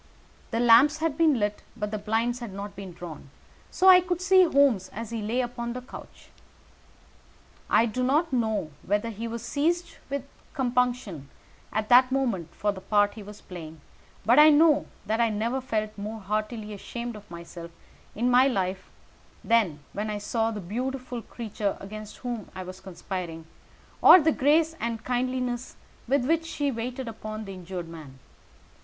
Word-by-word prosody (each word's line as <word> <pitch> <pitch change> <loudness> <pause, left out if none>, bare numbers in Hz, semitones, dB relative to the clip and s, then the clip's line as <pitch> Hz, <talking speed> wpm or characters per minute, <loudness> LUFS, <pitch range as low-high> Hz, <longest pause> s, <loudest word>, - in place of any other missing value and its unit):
The 230 - -1
lamps 240 +6 +6
had 315 -2 -1
been 310 -5 +3
lighted, 205 0 -1 0.2
but 210 0 -3
the 215 - -3
blinds 225 +4 0
had 235 -4 -6
not 200 +1 -7
been 195 -2 -8
drawn, 170 -5 -9 0.4
so 375 - -1
that 380 - +11
I 365 0 +8
could 355 -1 -2
see 375 0 +5
Holmes 275 - +3
as 230 +1 -7
he 230 -1 -3
lay 225 +5 0
upon 240 -1 -4
the 250 - -5
couch. 250 - -12 1.4
I 230 - +5
do 235 +2 -3
not 285 +5 +2
know 220 -9 0
whether 210 +3 -1
he 225 +2 -5
was 230 0 -5
seized 325 +8 -1
with 280 -1 -2 0.3
compunction 245 - -1 0.4
at 215 0 -2
that 255 +1 +7
moment 235 -11 0
for 205 - 0
the 190 -2 -9
part 205 +1 +2
he 220 - -9
was 210 +1 -11
playing, 160 -3 -9 0.5
but 240 +6 +6
I 305 +1 +9
know 305 0 +5 0.2
that 220 +2 0
I 230 - +3
never 230 +5 -1
felt 215 -4 -2
more 215 +2 -5
heartily 215 +1 -3
ashamed 235 +3 -6
of 210 -1 -12
myself 170 0 -9 0.5
in 245 +4 +1
my 255 +2 +6
life 190 -6 -2 0.5
than 210 -11 +2
when 210 +1 -3
I 210 - -2
saw 225 +2 -1
the 215 -2 -4
beautiful 250 +5 -4
creature 215 -3 -4
against 215 +1 -9
whom 240 -4 -4
I 185 - -5
was 185 +1 -9
conspiring, 180 -3 -6 0.6
or 370 - +10
the 320 0 +3
grace 315 +4 +3
and 230 -1 -3
kindliness 250 0 -2 0.3
with 265 0 +2
which 325 +3 +1
she 290 -3 -1
waited 250 +2 -4
upon 215 -1 -6
the 195 - -7
injured 180 -1 -6
man. 155 -5 -11
230 Hz, 175 wpm, -27 LUFS, 205-255 Hz, 1.4 s, that